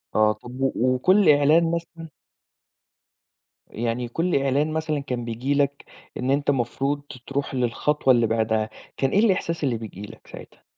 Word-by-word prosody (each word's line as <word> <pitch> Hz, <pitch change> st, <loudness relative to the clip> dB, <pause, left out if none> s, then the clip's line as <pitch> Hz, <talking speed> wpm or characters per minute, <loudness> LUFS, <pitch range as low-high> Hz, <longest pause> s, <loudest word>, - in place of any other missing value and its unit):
آه، 110 Hz, 0 st, +4 dB
طَب 120 Hz, +4 st, -10 dB
و 135 Hz, -, +2 dB
وكل 155 Hz, -, +3 dB
إعلان 150 Hz, +3 st, +4 dB
مثلًا 170 Hz, -1 st, -5 dB, 1.6 s
يعني 120 Hz, +2 st, -3 dB
كل 165 Hz, +9 st, -1 dB
إعلان 140 Hz, +3 st, +1 dB
مثلًا 160 Hz, -1 st, -1 dB
كان 125 Hz, -4 st, -4 dB
بييجي 120 Hz, +4 st, -2 dB
لك 140 Hz, 0 st, 0 dB, 0.3 s
إن 125 Hz, +1 st, -1 dB
أنت 145 Hz, +1 st, +2 dB
مفروض 135 Hz, +2 st, -1 dB, 0.3 s
تروح 140 Hz, 0 st, -3 dB
للخطوة 130 Hz, +3 st, +2 dB
اللي 120 Hz, -2 st, +3 dB
بعدها، 110 Hz, -1 st, 0 dB, 0.3 s
كان 135 Hz, -, +1 dB
إيه 200 Hz, -, +3 dB
الإحساس 185 Hz, -6 st, +1 dB
اللي 125 Hz, -5 st, +1 dB
بييجي 110 Hz, -3 st, -9 dB
لك 105 Hz, -, -11 dB
ساعتها؟ -, -, -13 dB
135 Hz, 150 wpm, -24 LUFS, 120-150 Hz, 1.6 s, آه